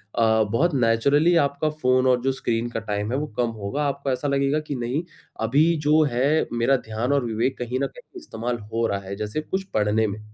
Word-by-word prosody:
अ, 110 Hz, -1 st, +3 dB
बहुत 155 Hz, +10 st, +2 dB
नेचुरली 140 Hz, +8 st, +3 dB
आपका 140 Hz, +2 st, -1 dB
फ़ोन 130 Hz, -4 st, +1 dB
और 125 Hz, -1 st, +3 dB
जो 135 Hz, +2 st, +1 dB
स्क्रीन 120 Hz, -3 st, -2 dB
का 120 Hz, -, -3 dB
टाइम 105 Hz, 0 st, -3 dB
है 130 Hz, -, 0 dB
वो 150 Hz, +2 st, -2 dB
कम 120 Hz, -1 st, +1 dB
होगा 105 Hz, +9 st, -2 dB
आपको 140 Hz, -1 st, -2 dB
ऐसा 130 Hz, +3 st, -2 dB
लगेगा 140 Hz, +1 st, +1 dB
कि 150 Hz, -2 st, -5 dB
नहीं 125 Hz, +6 st, -2 dB, 0.4 s
अभी 135 Hz, +8 st, +3 dB, 0.2 s
जो 155 Hz, +1 st, +5 dB
है 140 Hz, +6 st, +2 dB
मेरा 120 Hz, +3 st, +3 dB
ध्यान 115 Hz, +5 st, -1 dB
और 140 Hz, -3 st, +1 dB
विवेक 120 Hz, +4 st, -1 dB
कहीं 125 Hz, +1 st, -2 dB
न -, -, +1 dB
कहीं 485 Hz, -6 st, -13 dB
इस्तेमाल 120 Hz, -, -4 dB, 0.2 s
हो 115 Hz, 0 st, +1 dB
रहा 100 Hz, -1 st, -1 dB
है 100 Hz, -, -4 dB
जैसे 105 Hz, +8 st, -3 dB
कुछ 190 Hz, +5 st, -3 dB
पढ़ने 110 Hz, +1 st, +2 dB
में। 100 Hz, +1 st, -5 dB
125 Hz, 215 wpm, -24 LUFS, 115-145 Hz, 0.4 s, जो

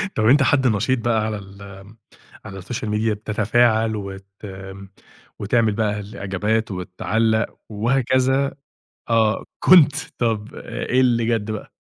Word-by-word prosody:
طب 110 Hz, -, +1 dB
أنت 135 Hz, +5 st, +5 dB
حد 135 Hz, -2 st, +3 dB
نشيط 115 Hz, +4 st, +1 dB
بقى 115 Hz, -2 st, 0 dB
على 110 Hz, -1 st, -3 dB
ال 100 Hz, 0 st, -13 dB
آآ، 100 Hz, +2 st, -12 dB, 0.5 s
على 95 Hz, -2 st, -8 dB
الSocial 110 Hz, +3 st, -5 dB
Media 105 Hz, +1 st, 0 dB
بتتفاعل 110 Hz, +1 st, +1 dB
وت 100 Hz, -1 st, -7 dB, 1.1 s
وتعمل 110 Hz, +1 st, +1 dB
بقى 105 Hz, -1 st, -1 dB
الإعجابات 105 Hz, +1 st, -2 dB
وتعلّق 110 Hz, +5 st, -1 dB
وهكذا؟ 130 Hz, +5 st, +1 dB, 0.6 s
آه، 110 Hz, -1 st, +2 dB, 0.2 s
كنت. 155 Hz, -6 st, +7 dB, 0.3 s
طب 110 Hz, -3 st, -2 dB
إيه 130 Hz, -, -2 dB
اللي 120 Hz, -3 st, +2 dB
جد 115 Hz, -2 st, -1 dB
بقى؟ 105 Hz, -1 st, -6 dB
110 Hz, 125 wpm, -21 LUFS, 105-120 Hz, 1.1 s, كنت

